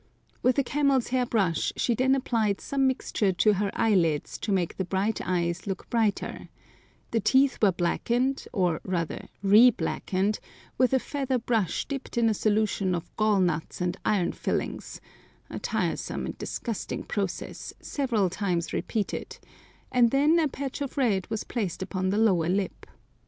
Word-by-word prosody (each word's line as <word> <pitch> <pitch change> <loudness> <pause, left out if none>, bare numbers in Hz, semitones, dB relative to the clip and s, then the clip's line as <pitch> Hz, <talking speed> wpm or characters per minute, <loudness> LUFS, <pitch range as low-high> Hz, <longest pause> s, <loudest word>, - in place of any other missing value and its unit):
With 255 +1 +3
a 280 - +4
camel's 275 -2 +1
hair 250 -1 +1
brush 195 -9 +1
she 240 - +2
then 260 +3 +3
applied 225 -6 0
some 270 -1 +1
mixture 220 -6 0
to 210 +4 +4
her 200 +1 0
eyelids 170 -9 +1
to 215 - -3
make 185 -4 0
the 190 - 0
bright 195 +4 -1
eyes 175 +1 -1
look 195 - -4
brighter, 225 -3 -1 0.6
the 230 - +2
teeth 265 +6 +3
were 205 -3 +5
blackened, 240 +10 0
or 180 -7 0
rather 170 -3 -3 0.2
reblackened, 210 -2 +3 0.4
with 255 0 +3
a - - +4
feather 270 -1 -1
brush 225 -6 0
dipped 275 -3 -5
in 230 -1 +4
a - - +2
solution 210 -3 +1
of 170 - -7
gall 215 -2 +3
nuts 165 -3 -1
and 180 0 -1
iron 195 -5 +1
filings—a - - -6
tiresome - - -2
and - - -6
disgusting 230 -4 -4
process, 195 -3 -4
several 235 -9 0
times 180 -2 -2
repeated, 215 -3 -3 0.5
and 245 -2 +5
then 295 +6 +4
a 315 - +3
patch 275 0 -5
of 280 +1 -4
red 210 -9 +1
was 220 -1 -2
placed 195 -7 -3
upon 185 -1 -2
the 200 - 0
lower 185 -7 +3
lip. 190 +1 -2
215 Hz, 155 wpm, -27 LUFS, 185-250 Hz, 0.6 s, were